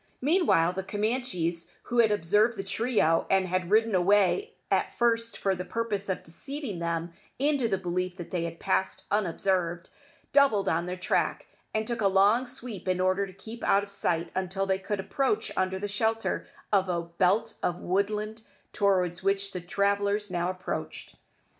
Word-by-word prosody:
Meanwhile 270 - +3
the 190 - -2
Camanchees, 195 -5 -2
who 245 -1 -1
had 225 -2 +5
observed 210 +4 +2
the 195 - -3
trio, 200 -5 +1
and 190 -1 +3
had 185 -1 -1
ridden 220 +1 +3
away 205 - +3 0.2
at - - +1
first 230 -1 +1
for 195 - +1
the 180 -1 -4
purpose 210 -2 -2
of 190 - -2
deceiving 260 - -5
them 170 0 -2 0.2
into 280 -3 +2
the 195 -3 0
belief 180 0 -2
that 175 - -8
they 175 -2 -1
had 165 0 -6
passed 190 0 0
unobserved, 180 -3 0 0.4
doubled 270 -8 +4
on 170 +2 +1
their 180 +1 -4
track, 180 - 0 0.3
and 220 0 -1
took 235 0 -3
a 200 - +4
long 200 +6 +4
sweep 240 -7 -7
in 185 0 +1
order 185 +2 +2
to 190 - -12
keep 225 +5 -10
out 200 +1 +3
of 200 - -10
sight 170 -4 -1
until 190 +1 -1
they 190 0 0
could 205 +1 -3
approach 275 - 0
under 190 0 0
the 205 +2 -3
shelter 220 +2 -1 0.3
of 190 -2 +3
a 170 -1 0
belt 185 +6 +1
of 175 - 0
woodland 210 +4 -1 0.3
towards 185 -4 +1
which 195 +1 0
the 180 - -5
travellers 200 +2 0
now 175 0 0
approached. 185 0 -5
195 Hz, 170 wpm, -28 LUFS, 180-220 Hz, 0.4 s, had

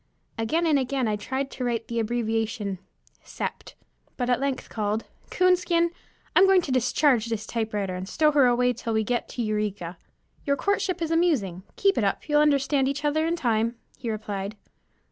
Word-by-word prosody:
Again 310 +10 0
and 305 -4 +4
again 260 -1 -1
I 215 - +1
tried 265 +6 -3
to 255 - -5
write 235 -2 -1
the 235 0 -2
abbreviation 225 -3 -1 0.4
"Sept.," - - -6 0.4
but 245 -1 0
at 245 - +2
length 275 -1 -2
called 215 0 -2 0.3
"Coonskin, 355 -2 +3 0.4
I'm 380 +2 +7
going 380 -2 +5
to 280 - -4
discharge 255 -1 +3
this 225 -2 -3
typewriter, 210 -4 -2
and 185 +1 -5
stow 305 -1 +3
her 285 -4 +5
away 245 0 +3
till 230 -1 -4
we 220 0 +2
get 240 +3 -2
to 240 - -3
Eureka." 205 -5 -2 0.4
"Your 280 - +1
courtship 375 +1 0
is 325 - -2
amusing. 280 - +1
Keep 395 -1 +2
it - - +1
up, 200 +8 -1
you'll 295 -1 +4
understand 275 -2 +3
each 280 +2 -2
other 310 +2 +2
in 335 - +1
time," 230 -5 0 0.2
he 235 - -5
replied. 210 -1 -4
245 Hz, 180 wpm, -26 LUFS, 220-295 Hz, 0.4 s, I'm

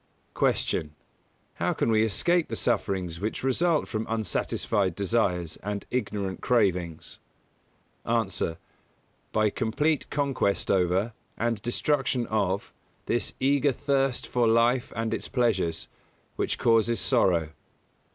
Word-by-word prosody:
124. - - +1
Q. 75 - -11 0.7
How - - +2
can - - 0
we 110 0 +4
escape 170 - +2
the - - -4
sufferings 95 -7 -1
which 110 +5 -3
result 155 +4 +2
from 110 0 -3
unsatisfied 100 -3 0
desires 95 -6 0
and 100 0 -5
ignorant 105 -5 -2
cravings? 90 -9 0 0.8
A. 115 -2 +1 1.0
By 110 -1 +2
complete 140 +6 0
conquest 140 -8 0
over, 95 +4 +1 0.2
and 115 -2 -1
destruction 130 +1 0
of, 100 -3 -1 0.3
this 120 -3 0
eager 140 +1 +3
thirst 135 -1 0
for 120 -2 +1
life 115 +2 +3
and 115 0 -1
its - - -3
pleasures, 110 -10 0 0.5
which - - -1
causes 115 0 +3
sorrow. 90 - +2
115 Hz, 115 wpm, -27 LUFS, 100-125 Hz, 1.0 s, we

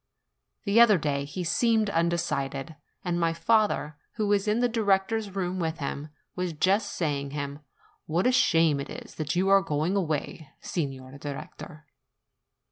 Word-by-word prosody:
The 205 +2 +3
other 215 -4 +7
day 140 -3 -1
he 180 +6 -5
seemed 220 +5 +2
undecided; 155 -4 -1 0.3
and 175 -1 0
my 165 -1 +2
father, 170 -4 +1 0.2
who 215 - 0
was 205 0 +2
in 210 +1 +2
the 245 - +3
director's 210 -2 0
room 185 -1 -2
with 165 -1 -1
him, 145 +1 -4 0.3
was 180 -2 -2
just 195 +6 +1
saying 140 -4 -1
to 140 - -8
him, 140 0 -4 0.5
"What 170 +4 0
a 250 - +5
shame 165 - +3
it 140 - -5
is - - -9
that 155 0 -3
you 185 +2 +2
are 195 0 +6
going 160 +2 -1
away, 160 -3 -2
Signor 135 -4 -5
Director!" 150 +3 -8
170 Hz, 160 wpm, -27 LUFS, 150-200 Hz, 0.5 s, other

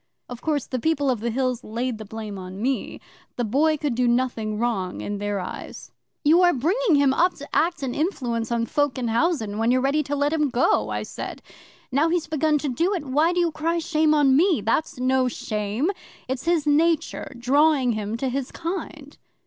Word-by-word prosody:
'Of 245 -1 -8
course 295 -4 -1
the 255 - -3
People 285 -1 +1
of 245 - -2
the 235 +2 -2
Hills 255 0 -1
laid 235 +1 -3
the 215 - -7
blame 215 -2 -7
on 185 +1 -8
me. 260 +4 -2 0.4
The 245 - -1
Boy 295 +8 +2
could 290 -3 -1
do 245 +1 +1
nothing 235 -3 0
wrong, 210 -6 -1
in 205 0 -4
their 205 -1 -2
eyes. 180 - -8 0.3
'"You 325 +4 +5
are 350 -1 +5
bringing 355 - +2
him 280 -2 +4
up 355 +5 +2
to 290 +1 -9
act 335 -3 +1
and 255 -2 -2
influence 245 - -2
on 235 -1 +1
folk 290 +2 0
in 245 -2 -1
housen, 225 -5 0
when 225 +1 +2
you're 255 +1 +4
ready 275 +4 +1
to 290 0 -3
let 290 +2 +1
him 300 -3 +1
go," 245 0 +2
I - - -2
said. - - -7 0.5
"Now 290 +5 +2
he's 340 -1 0
begun 310 0 +1
to 290 - -3
do 340 +11 0
it, 335 - -4
why 300 +6 +2
do 355 - 0
you 340 -2 +2
cry 325 +2 -1
shame 315 -2 +2
on 280 -3 +4
me? 340 - +4
That's 255 +7 0
no 255 0 +2
shame. 215 - -2 0.4
It's 260 +2 -4
his 335 -3 +2
nature 315 +2 +1
drawing 270 +1 +3
him 215 0 -3
to 265 +2 -1
his 265 +1 -3
kind." 320 -4 -6
270 Hz, 205 wpm, -24 LUFS, 235-315 Hz, 0.5 s, You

